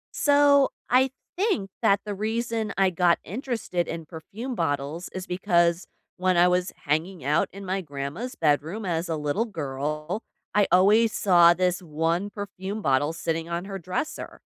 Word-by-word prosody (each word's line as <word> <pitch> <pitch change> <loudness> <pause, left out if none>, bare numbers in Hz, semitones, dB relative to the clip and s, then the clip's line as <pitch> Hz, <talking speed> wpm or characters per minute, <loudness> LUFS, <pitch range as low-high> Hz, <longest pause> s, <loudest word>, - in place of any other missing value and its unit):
So, 285 -1 +5 0.2
I 260 +2 +5 0.3
think 350 - 0
that 200 -3 +3
the 205 - -3
reason 220 +1 -2
I 195 -1 +3
got 175 0 +3
interested 220 - -3
in 165 -1 -5
perfume 195 +11 -7
bottles 155 - -2
is 185 -1 -6
because 175 -2 +1 0.3
when 185 -1 +2
I 175 +1 +6
was 180 0 +1
hanging 155 +1 -1
out 150 +3 +2
in 200 +1 -9
my 190 +1 -1
grandma's 145 - -5
bedroom 160 +7 0
as 170 -1 -2
a 160 - 0
little 150 +9 -1
girl, 150 - -4 0.3
I 205 -1 +3
always 210 +5 +5
saw 175 -3 +5
this 180 0 +1
1 165 +4 -1
perfume 205 0 -6
bottle 140 +2 +2
sitting 165 0 -3
on 170 +2 -3
her 195 -1 -6
dresser. 185 - -4
180 Hz, 155 wpm, -25 LUFS, 165-210 Hz, 0.3 s, I